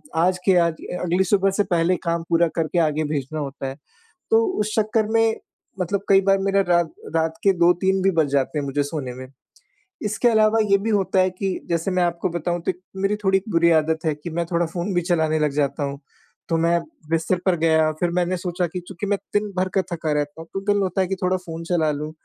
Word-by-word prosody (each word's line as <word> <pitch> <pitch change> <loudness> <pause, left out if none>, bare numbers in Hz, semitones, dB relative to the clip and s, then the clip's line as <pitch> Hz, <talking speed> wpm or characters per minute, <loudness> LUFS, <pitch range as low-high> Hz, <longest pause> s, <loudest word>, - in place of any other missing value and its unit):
आज 180 +3 +2
के 190 -2 +5
आज 170 -2 +3 0.3
अगली 180 +2 +2
सुबह 195 0 +2
से - - +5
पहले 170 +2 +2
काम 170 0 0
पूरा 170 0 +4
करके 165 +1 0
आगे 155 0 0
भेजना 145 +2 -3
होता 135 -1 -5
है। 135 - -5 0.6
तो 450 0 +5 0.2
उस 210 0 -1
चक्कर 215 0 +1
में 225 0 +3 0.4
मतलब 190 +3 0
कई 195 -1 +6
बार 195 0 +3
मेरा 195 0 +2
रात 170 -2 +2 0.2
रात 160 0 +1
के 195 - +6
2-3 180 +2 +3
भी 195 - +4
बज 150 -3 +3
जाते 140 +2 0
हैं 145 - -1
मुझे 140 +1 0
सोने 140 -3 -4
में। 130 0 -8 0.8
इसके 215 +4 +1
अलावा 220 0 +4
ये 200 - +6
भी 215 +3 -3
होता 195 -2 +1
है 185 0 +4
कि 190 0 -3
जैसे 170 +2 0
मैं 185 -1 +2
आपको 175 +1 -1
बताऊँ 175 0 -2
तो 190 - 0
एक 180 - -17 0.2
मेरी 195 +2 +1
थोड़ी 190 0 +3
बुरी 170 -2 +3
आदत 160 +1 -2
है 155 -2 +1
कि 150 +3 -8
मैं 170 +1 -1
थोड़ा 170 0 +2
फ़ोन 175 +4 -3
भी 175 - +3
चलाने 160 -3 +1
लग 150 -1 +1
जाता 145 0 0
हूँ 140 0 -4 0.5
तो 165 - +2
मैं 170 +1 +2 0.3
बिस्तर 165 +3 +1
पर 185 -2 +3
गया 160 -1 +3
फिर 175 - +1
मैंने 180 +1 0
सोचा 175 0 -2
कि 180 +3 -5
चूँकि 195 +1 -6
मैं 205 0 +1 0.2
दिन 205 0 0
भर 185 +1 +1
का - - +5
थका 160 -2 -2
रहता 150 +2 -2
हूँ 165 - -11
तो 195 - -3
दिल 205 - +2
होता 190 +1 0
है 185 - 0
कि 195 - -2
थोड़ा 185 +1 +2
फ़ोन 165 -2 -8
चला 165 -3 +1
लूँ, 150 +1 -4
175 Hz, 230 wpm, -22 LUFS, 160-190 Hz, 0.8 s, कई